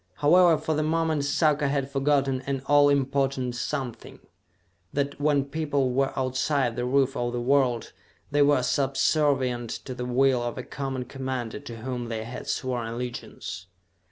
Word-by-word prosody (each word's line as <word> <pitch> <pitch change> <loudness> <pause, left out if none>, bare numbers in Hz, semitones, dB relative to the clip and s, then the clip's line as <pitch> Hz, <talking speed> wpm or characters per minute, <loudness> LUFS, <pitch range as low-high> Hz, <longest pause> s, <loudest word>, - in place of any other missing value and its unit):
However, 170 - +5
for 155 +1 -1
the 155 - 0
moment 160 -2 0
Sarka 150 0 +2
had 140 -1 -1
forgotten 135 -1 +1
an 135 -1 -2
all 145 0 +5
important 135 -2 0
something: 120 0 -4 0.7
that, 140 0 -2
when 145 -2 +2
people 140 -3 -1
were 135 +2 +1
outside 130 -1 0
the 120 0 -2
roof 135 +1 +2
of 120 0 -2
the 120 - -1
world, 125 -2 +1 0.4
they 145 0 +3
were 145 -3 +4
subservient 135 -2 +1
to 130 - -6
the 125 0 -5
will 130 0 +3
of 120 -1 -3
a 130 - -4
common 135 -2 -4
commander 130 -3 -4
to 120 -5 -9
whom 120 -1 -4
they 110 -1 -3
had 120 +3 -8
sworn 125 -3 -2
allegiance. 115 -6 -6
135 Hz, 155 wpm, -26 LUFS, 125-145 Hz, 0.7 s, However